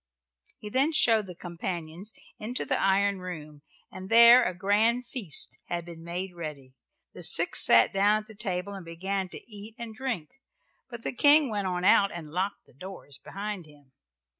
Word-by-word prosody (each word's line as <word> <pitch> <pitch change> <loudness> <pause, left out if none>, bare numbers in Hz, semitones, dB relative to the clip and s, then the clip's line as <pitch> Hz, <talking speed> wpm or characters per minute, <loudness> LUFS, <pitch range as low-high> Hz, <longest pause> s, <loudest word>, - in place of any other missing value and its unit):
He 210 - -10
then 275 +6 +2
showed 225 -8 +4
the 180 - -9
companions 175 +2 -6 0.3
into 235 +4 -3
the - - -1
iron 200 0 +2
room, 155 -5 -8 0.3
and 185 0 -9
there 235 +2 +8
a 185 - -2
grand 220 +6 +1
feast 215 - -3
had 170 -1 -4
been 165 -1 -11
made 180 +2 -5
ready. 150 -6 -8 0.4
The - - -10
six - - +3
sat 115 - +6
down 205 +2 +2
at 215 -2 -15
table 190 -2 -3
and 195 -2 -8
began 190 +3 -3
to - - -11
eat 215 0 -11
and 235 -2 -7
drink, 225 - -4 0.6
but 235 -2 -9
the - - -3
king 285 0 +5
went 205 -2 -2
on 180 -1 -2
out 200 0 +5
and 160 -3 -8
locked 185 +4 -3
the - - -24
doors 145 -3 -8
behind 200 -2 -6
him. 145 -3 -21
195 Hz, 175 wpm, -27 LUFS, 170-220 Hz, 0.6 s, there